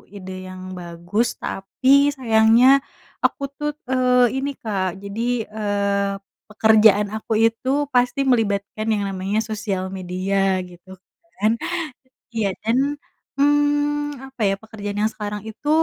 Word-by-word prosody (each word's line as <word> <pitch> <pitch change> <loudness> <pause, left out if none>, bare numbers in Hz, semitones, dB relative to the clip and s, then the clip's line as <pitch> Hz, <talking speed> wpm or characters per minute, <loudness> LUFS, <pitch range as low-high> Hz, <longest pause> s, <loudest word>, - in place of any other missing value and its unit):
ide 190 -1 -8 0.2
yang 185 0 -9 0.2
bagus 175 +6 -2
tapi 195 +7 -3 0.3
sayangnya 225 0 +5 0.6
aku 280 - 0
tuh, 295 0 -1 0.2
eee, 250 -2 +3
ini 280 - -1
Kak 195 -4 -1 0.2
jadi, 200 +3 -5 0.3
eee, 200 -1 0 0.4
pekerjaan 215 -1 +5
aku 220 - -7
itu 230 +3 -1 0.2
pasti 245 +1 +2
melibatkan 215 -1 0
yang 205 -1 0
namanya 195 +2 -1
sosial 210 -3 -2
media 185 +2 -3 0.3
gitu 180 +1 -17 0.5
kan. 215 +2 +3 0.8
Iya 220 -3 +1
dan, 225 +3 +1 0.6
mmm, 290 0 +2
apa 265 -3 -11
ya - - +1
pekerjaan 205 -2 -6
yang 215 - +3
sekarang 210 -1 -5
itu 260 +7 -6
215 Hz, 120 wpm, -22 LUFS, 200-245 Hz, 0.8 s, sayangnya